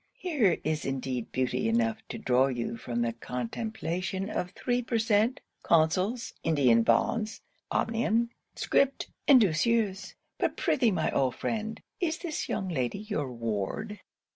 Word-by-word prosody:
Here 275 - +2
is 155 0 -1
indeed 130 -3 -3
beauty 130 - 0
enough 225 -1 +1
to - - -4
draw 130 - +3
you 120 -3 -2
from 120 0 -2
the 115 -1 -1
contemplation 185 - -3
of 180 - -2
three 245 +5 -1
per 235 -1 -1
cent. 225 +3 +2 0.2
consols, 185 +9 +2
India 140 -7 +4
bonds, 120 - +2 0.3
omnium, 230 +1 +1 0.2
scrip, 275 0 +2 0.2
and 275 -3 +9
douceurs. 205 +1 +1 0.2
But - - 0
prithee, 245 -4 +3
my 170 -6 0
old 130 -2 +1
friend, 220 0 -3 0.2
is 325 -4 0
this 330 -4 -4
young 195 -3 -1
lady 130 -4 -1
your 200 - -3
ward?' 115 - -3
195 Hz, 140 wpm, -29 LUFS, -, 0.3 s, and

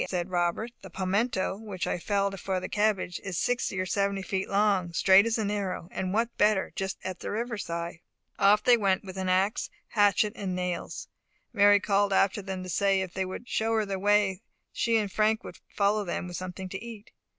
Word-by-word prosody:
said 180 0 -2
Robert. 175 +6 0
"The 190 - -10
palmetto, 190 +2 -1
which 205 -4 -5
I - - -2
felled 200 +1 -1
for 190 0 -1
the - - -5
cabbage, 205 -4 0
is 195 -4 -4
sixty 245 -5 0
or 185 - 0
seventy 200 +1 0
feet 190 0 -2
long, 195 -4 +2
straight 190 +5 +6
as 230 - 0
an 210 -2 -1
arrow, 190 -4 -3
and 185 -1 -3
what 225 +3 +1
is - - -49
better, 210 -2 +2
just 190 0 -3
at 185 -1 -5
the - - -5
river 230 +3 -2
side." 170 -4 -5 0.4
Off 205 +1 +5
they 245 -1 +6
went 195 -3 +1
with 190 -1 -9
ax, 190 +2 0 0.2
hatchet, 205 0 +3
and 185 -2 -3
nails. 180 -1 -4 0.5
Mary 205 -1 +6
called 200 0 +1
after 195 +2 +2
them 190 -1 -5
to 185 - -7
say, 195 +1 +2
that 190 -1 -1
if - - -28
they 190 0 -1
would 190 +6 -7
show 225 -1 0
her 220 -1 +1
the 195 -1 -3
way, 205 -1 +2 0.3
she 230 -1 +2
and 210 -3 -1
Frank 220 +3 +1
would - - -10
follow 205 +1 +1
them 180 - -3
with 175 - -7
something 185 +1 -6
to 195 +3 -6
eat. 225 -3 -10
195 Hz, 210 wpm, -28 LUFS, 185-210 Hz, 0.5 s, straight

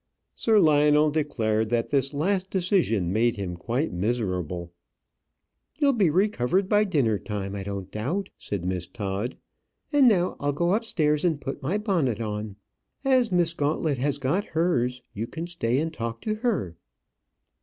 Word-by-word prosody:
Sir 220 -2 +3
Lionel 150 -2 +4
declared 110 -8 0
that 115 0 0
this 135 -1 +1
last 185 +6 0
decision 170 - +1
made 115 +2 +2
him 95 -3 -4
quite 120 - -2
miserable. 90 -4 -2 1.1
"You'll 285 -2 +3
be 205 -8 +3
recovered 185 - +1
by 210 +1 +3
dinner 130 - +1
time, 100 -2 -4
I 100 - -4
don't 100 -1 -5
doubt," 155 - -2
said 95 -4 -5
Miss 90 -1 -2
Todd. 105 +2 -4 0.6
"And 285 -3 +6
now 185 -6 +2
I'll 145 0 0
go 170 +5 +1
upstairs 155 -9 +1
and 165 -5 +1
put 135 - -5
my 165 +10 0
bonnet 170 - 0
on. 105 -2 -4 0.5
As 255 -5 +3
Miss 175 -2 +2
Gauntlet 145 -2 0
has 140 +2 0
got 145 +9 0
hers, 125 -7 +1
you 110 +3 -4
can 165 +7 -5
stay 130 -9 -1
and 160 +3 -1
talk 115 -4 -4
to 215 - -1
her." 215 - -1
145 Hz, 155 wpm, -26 LUFS, 110-180 Hz, 1.1 s, And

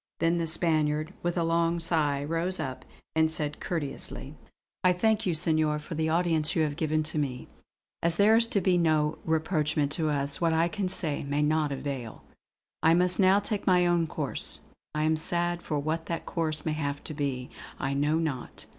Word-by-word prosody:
Then 170 +1 +2
the 165 - -1
Spaniard, 155 0 +1
with 175 +1 -2
a 170 - +2
long 165 +1 +1
sigh, 155 -4 +1
rose 165 +4 -1
up 130 -4 -5 0.3
and 160 0 +3
said 150 -1 -2
courteously: 145 -3 -3 0.5
"I 180 0 +5
thank 220 +3 +1
you 175 - +1
Senor, 155 -2 +1
for 150 +3 -8
the 160 0 -1
audience 165 -2 +1
which - - +2
you 160 - +3
have 150 -2 -1
given 155 -1 0
to 155 0 -2
me. 130 -4 -3 0.5
As 170 0 +4
there 205 +4 +5
is 230 0 +4
to 205 -4 0
be 180 0 +2
no 155 -2 +1
rapprochement 155 -2 0
to 155 +1 0
us, 140 0 -1
what 165 -1 +2
I 165 +1 +2
can 195 -1 -2
say 160 -6 0
may 145 +1 0
not 150 -1 +1
avail. 135 -4 -5 0.6
I 165 +1 +5
must 180 0 +2
now 190 +1 +5
take 205 0 -3
my 180 -1 +4
own 175 -1 +2
course. - - -3 0.3
I 150 - 0
am 160 +1 +2
sad; 175 +2 +2
for 150 - -3
what 155 +3 -2
that 170 - -4
course 155 -3 -2
may 160 - 0
have 145 -2 -3
to - - -6
be, 135 -4 -3 0.3
I 135 - -2
know 145 +3 +1
not. 150 -6 -4
160 Hz, 200 wpm, -28 LUFS, 150-170 Hz, 0.6 s, I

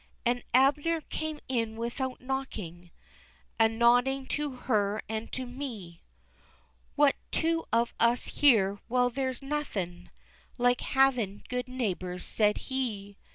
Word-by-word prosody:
An' 245 +1 +1
Abner 290 +6 +3
came 310 +1 -4
in 230 -4 -1
without 240 +3 -3
knocking, 215 -10 -5 0.7
A 225 0 +6
nodding 245 +4 +3
to 295 0 -1
her, 215 -4 0
an' 220 +1 -3
to 260 - -4
me, 240 -10 -7 0.9
"What, 290 -1 +5
two 330 0 0
of 235 +1 +2
us 235 +1 +3
here! 205 -8 +5
well 245 0 +2
there's 260 +1 -2
nothin' 195 -12 -3 0.5
Like 245 0 +3
havin' 250 -7 +2
good 250 0 -2
neighbors," 185 -8 -3
said 210 -1 +2
he. 215 -7 -3
245 Hz, 120 wpm, -29 LUFS, 215-270 Hz, 0.9 s, A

